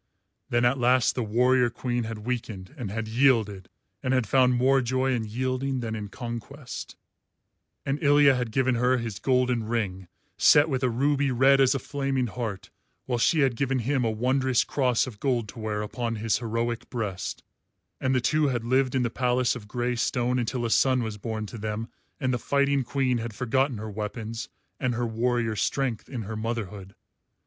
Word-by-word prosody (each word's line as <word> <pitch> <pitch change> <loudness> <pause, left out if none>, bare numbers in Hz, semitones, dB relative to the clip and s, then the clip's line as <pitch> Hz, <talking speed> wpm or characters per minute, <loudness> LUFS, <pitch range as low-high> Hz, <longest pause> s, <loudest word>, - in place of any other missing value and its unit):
Then 120 0 +2
at 125 +2 +2
last 125 0 +3
the 125 - -2
warrior 125 +3 +3
queen 120 0 -2
had 110 -1 -6
weakened 115 -3 -4
and 125 -9 -5
had 110 +2 -4
yielded, 110 -6 +2 0.3
and 130 +1 +1
had 125 -3 +2
found 125 +2 +3
more 135 +2 +3
joy 130 +2 0
in 115 -3 -1
yielding 130 +3 -2
than 115 -2 -3
in 105 -2 -4
conquest; 120 +4 -7 0.9
and 140 +1 -1
Ilya 145 -2 +6
had 125 -2 -2
given 130 +2 +2
her 125 +2 +2
his 115 -5 -4
golden 125 -3 +1
ring 105 -5 -2 0.3
set 150 +2 +6
with 130 -3 -1
a 130 - +2
ruby 140 +3 +1
red 135 +2 +4
as 135 +1 +4
a - - +2
flaming 135 -1 -1
heart, 110 -4 -5 0.3
while 120 -2 -1
she 155 +6 +3
had 135 -3 +2
given 135 +2 0
him 130 +2 0
a 115 - +1
wondrous 130 +3 +1
cross 125 -4 +1
of 115 -6 -9
gold 125 -5 0
to 115 - -10
wear 105 -1 -2
upon 115 +2 -3
his 110 0 0
heroic 115 0 -2
breast; 100 -6 -4 0.6
and 130 0 +1
the 130 - +2
two 155 +4 +2
had 120 -4 -1
lived 130 +2 +1
in 130 - +2
the 120 - -1
palace 125 -1 +1
of 110 -4 -9
grey 120 +2 -1
stone 125 +1 0
until 120 +1 -2
a 115 - -1
son 130 0 +3
was 110 -2 -5
born 110 0 -4
to 110 +2 -8
them 110 +2 -4 0.3
and 130 -2 0
the 125 - -1
fighting 140 +1 +1
queen 130 -1 0
had 115 -2 -5
forgotten 130 +2 0
her 110 +1 -6
weapons 110 +2 -5 0.3
and 125 -2 0
her 120 +1 -1
warrior 115 0 0
strength 125 +1 -1
in 120 -4 -4
her 110 +2 -6
motherhood. 105 -4 -5
120 Hz, 190 wpm, -26 LUFS, 115-130 Hz, 0.9 s, Ilya